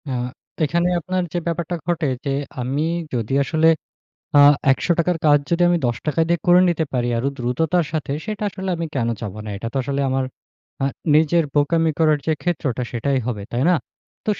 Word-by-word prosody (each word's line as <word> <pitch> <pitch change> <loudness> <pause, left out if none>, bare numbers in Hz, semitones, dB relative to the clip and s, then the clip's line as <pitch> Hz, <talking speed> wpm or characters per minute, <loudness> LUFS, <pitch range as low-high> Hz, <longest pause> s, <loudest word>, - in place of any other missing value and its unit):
আ - - -3 0.5
এখানে 170 +4 +1
আপনার 185 +2 -2
যে, - - 0
ব্যাপারটা 170 +1 -2
ঘটে 170 -3 0 0.2
যে, - - -1 0.3
আমি 135 +5 -1 0.3
যদি 115 0 -2
আসলে, 160 +3 +2 0.7
আ - - +8 0.3
৳১০০ 170 +6 +1
র - - -3
কাজ 145 -1 +6
যদি 170 +1 +1
আমি 175 - +3
৳১০ 130 +7 -1
দিয়ে 170 0 +1
করে 175 +1 +7
নিতে 170 -2 0
পারি 120 -1 0
আরও 130 +4 0
দ্রুততার 155 +8 0
সাথে 155 -3 -2
সেটা 215 -1 -4
আসলে 190 -1 -5
আমি 165 0 -3
কেন 120 -4 0
চাবো 105 -2 -5
না? - - -5
এটা 115 - -5
তো - - -1
আসলে 140 +2 -2
আমার 130 0 0 0.6
আ - - +3 0.3
নিজের 160 +2 +4
বোকামি 160 +3 +2
করার 155 -2 +4
যে, 160 - +1
ক্ষেত্রটা, 145 -8 -1
সেটাই 135 +3 0
হবে। 110 -5 -3
তাই 120 - -1
না? - - +5 0.5
তো - - -1
155 Hz, 190 wpm, -21 LUFS, 130-170 Hz, 0.7 s, আ